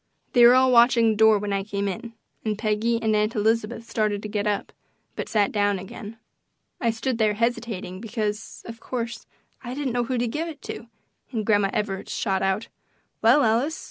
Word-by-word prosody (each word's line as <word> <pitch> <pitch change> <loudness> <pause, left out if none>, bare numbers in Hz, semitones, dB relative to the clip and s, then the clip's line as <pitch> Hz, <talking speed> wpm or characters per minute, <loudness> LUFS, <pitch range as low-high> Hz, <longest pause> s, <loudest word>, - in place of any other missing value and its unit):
They 240 - +6
were 245 - +7
all 260 0 +5
watching 235 -1 +5
the - - -1
door 220 0 +5
when 205 0 -3
I 195 0 0
came 200 0 -3
in, 225 +5 -5 0.3
and 215 -2 -1
Peggy 220 +2 0
and 220 -1 +2
Aunt 210 +1 +1
Elizabeth 225 +2 0
started 210 -2 -1
to - - -4
get 210 0 -2
up, 205 -1 -2 0.4
but - - -5
sat 210 -3 +2
down 205 -1 +1
again. 205 +4 -9 0.6
I 235 - +1
stood 230 +2 -2
there 215 -1 +2
hesitating 225 -5 -2
because, 215 -2 -4
of 230 0 -9
course, 240 -2 -5 0.4
I 245 +1 -5
didn't 275 -4 -2
know 245 -1 0
who 255 +1 -2
to 240 0 0
give 310 +8 -3
it 310 -3 -9
to, 235 - -7 0.4
and 220 -4 -2
Grandma 205 -2 +3
Evarts 195 -2 -3
shot 190 -3 0
out, 195 +3 0 0.5
"Well, 240 +6 +5
Alice! 240 +8 +1
220 Hz, 195 wpm, -24 LUFS, 205-235 Hz, 0.6 s, were